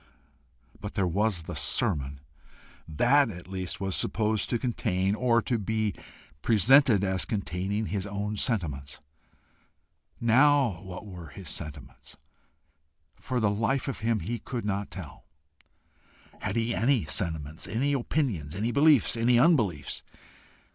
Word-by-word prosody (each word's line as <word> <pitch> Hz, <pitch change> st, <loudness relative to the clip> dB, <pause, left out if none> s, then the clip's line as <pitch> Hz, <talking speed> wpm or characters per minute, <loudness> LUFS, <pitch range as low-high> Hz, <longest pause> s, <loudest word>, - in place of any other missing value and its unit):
But -, -, -7 dB
there 95 Hz, -, +1 dB
was 95 Hz, 0 st, +1 dB
the 85 Hz, +1 st, -7 dB
sermon! 70 Hz, 0 st, 0 dB, 0.7 s
That 125 Hz, -, +3 dB
at 90 Hz, -4 st, -9 dB
least 95 Hz, +1 st, -4 dB
was 95 Hz, -1 st, -1 dB
supposed 110 Hz, -1 st, 0 dB
to 120 Hz, -, +1 dB
contain, 105 Hz, -6 st, 0 dB
or 115 Hz, 0 st, +2 dB
to 120 Hz, +1 st, 0 dB
be 110 Hz, 0 st, -1 dB, 0.5 s
presented 115 Hz, -, +5 dB
as 95 Hz, -1 st, +1 dB
containing, 100 Hz, +1 st, -2 dB
his 100 Hz, +2 st, -3 dB
own 100 Hz, +1 st, -3 dB
sentiments. 75 Hz, -, -2 dB, 1.2 s
Now 125 Hz, -, +4 dB
what 95 Hz, +1 st, -8 dB
were 90 Hz, -5 st, -9 dB
his 95 Hz, 0 st, -9 dB
sentiments? 70 Hz, -3 st, -8 dB, 1.0 s
For 130 Hz, -2 st, -2 dB
the 105 Hz, -3 st, +2 dB
life 115 Hz, +7 st, 0 dB
of 135 Hz, -, -3 dB
him 110 Hz, -2 st, 0 dB
he 115 Hz, +7 st, -3 dB
could 120 Hz, -5 st, -5 dB
not 100 Hz, 0 st, -2 dB
tell. 85 Hz, -8 st, -10 dB, 1.1 s
Had -, -, -3 dB
he 115 Hz, 0 st, 0 dB
ANY 120 Hz, -, +2 dB
sentiments, 80 Hz, -1 st, -3 dB
any 125 Hz, +9 st, 0 dB
opinions, 120 Hz, -, -1 dB
any 110 Hz, +5 st, -1 dB
beliefs, 140 Hz, -2 st, +4 dB
any 120 Hz, +1 st, +3 dB
unbeliefs? 115 Hz, -, +2 dB
105 Hz, 130 wpm, -28 LUFS, 90-120 Hz, 1.2 s, presented